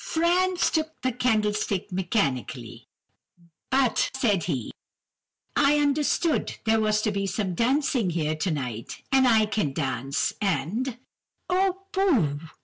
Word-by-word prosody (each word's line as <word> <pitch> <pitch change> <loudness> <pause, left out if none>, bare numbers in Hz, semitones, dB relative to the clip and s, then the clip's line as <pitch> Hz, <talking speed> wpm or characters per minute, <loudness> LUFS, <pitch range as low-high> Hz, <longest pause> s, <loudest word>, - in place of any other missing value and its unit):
"Franz 355 +2 +1
took 315 -1 -2
the 255 - +1
candlestick 210 -4 0
mechanically, 180 - -2 0.8
but, 260 -2 +2
said 210 -9 +1
he:— 135 -10 -3 0.8
"'I 290 +1 +4
understood 295 +2 +1
there 225 0 +3
was 215 0 +1
to 215 - +1
be 200 -1 -2
dancing 230 - 0
here 155 -2 -1
tonight, 140 - -4
and 265 -1 +5
I 220 -3 +5
can 210 -10 -1
dance, 135 -1 -1
and—' 205 - -1 0.5
"'Oh, 380 +1 +1
pooh! 270 - +2
215 Hz, 115 wpm, -26 LUFS, 170-275 Hz, 0.8 s, and